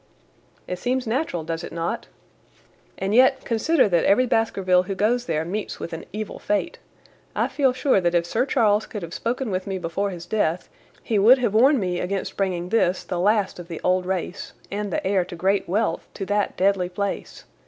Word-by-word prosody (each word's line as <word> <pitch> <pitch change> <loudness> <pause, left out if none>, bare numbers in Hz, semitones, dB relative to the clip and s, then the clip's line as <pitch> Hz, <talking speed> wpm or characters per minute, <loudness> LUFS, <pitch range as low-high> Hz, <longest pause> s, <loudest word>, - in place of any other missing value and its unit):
"It 180 - -4
seems 255 +4 -1
natural, 225 - -1
does 165 +1 -4
it - - -7
not? 170 +7 -3 0.9
And 195 +2 -2
yet, 260 +3 +4
consider 255 +4 +2
that 170 -3 +2
every 215 +6 +4
Baskerville 195 -7 +2
who 190 +2 -4
goes 240 +5 +1
there 155 +1 -1
meets 205 +5 -4
with 165 - -6
an 165 - -6
evil 215 +1 -5
fate. 210 - -1 0.6
I - - +1
feel 270 -3 +2
sure 255 -5 +2
that 175 0 +1
if 170 -1 +2
Sir 235 +9 0
Charles 215 -6 +2
could 210 -4 -6
have 170 0 -7
spoken 240 0 -2
with 185 +1 -2
me 195 -1 -2
before 185 +3 -2
his 175 -3 -7
death 180 -3 -1 0.3
he 215 -3 +1
would 235 +7 +7
have 235 -5 0
warned 260 +5 +5
me 180 -3 -1
against 195 +1 -3
bringing 180 -3 -1
this, 185 -4 +2
the 180 - -3
last 200 0 +1
of 175 - -8
the 165 -2 -6
old 180 0 +1
race, 185 -1 -3 0.2
and 205 0 -3
the - - -2
heir 190 -1 +2
to 175 - -9
great 190 +2 0
wealth, 215 +5 0
to 195 - -4
that 205 +1 -1
deadly 190 -1 +2
place. 200 +2 -4
195 Hz, 200 wpm, -23 LUFS, 180-225 Hz, 0.9 s, would